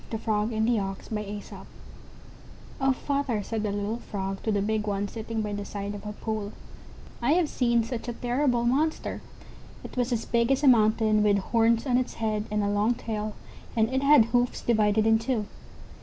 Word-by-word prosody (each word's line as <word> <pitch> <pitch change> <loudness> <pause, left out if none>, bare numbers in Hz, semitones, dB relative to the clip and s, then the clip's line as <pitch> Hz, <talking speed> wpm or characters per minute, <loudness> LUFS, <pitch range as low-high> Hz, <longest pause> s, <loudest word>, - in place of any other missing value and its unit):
THE 225 - -2
FROG 215 0 -1
AND 220 0 0
THE 235 -2 +2
OX 195 +1 -5 1.7
"Oh, 270 0 +4
father," 265 -5 -1
said 220 +1 -3
a - - -1
little 205 +3 -2
Frog 195 -3 -5
to 220 - -1
the 205 - +1
big 215 +1 -1
one 200 0 -1
sitting 225 0 -4
by 210 -1 -3
the 205 0 -3
side 200 0 -5
of 205 +1 -8
a - - -3
pool, 215 -1 -4 0.7
"I 250 +5 +3
have 345 -2 +3
seen 235 -4 +1
such 235 +1 -5
a 240 - -2
terrible 245 0 0
monster! 295 +6 0 0.6
It - - -9
was 250 0 0
as 235 -2 -1
big 235 +1 +1
as 270 +2 +1
a - - +5
mountain, 215 -2 +4
with 205 -1 +4
horns 230 +3 +2
on 250 -2 +3
its 255 - -3
head, 215 -1 -1
and 210 0 0
a - - 0
long 210 +4 +2
tail, 215 -2 -4 0.4
and 225 +3 +2
it 265 - +1
had 280 -4 +6
hoofs 245 +1 0
divided 215 -2 +2
in 225 0 +4
two." 225 -2 -1
225 Hz, 195 wpm, -27 LUFS, 210-245 Hz, 1.7 s, had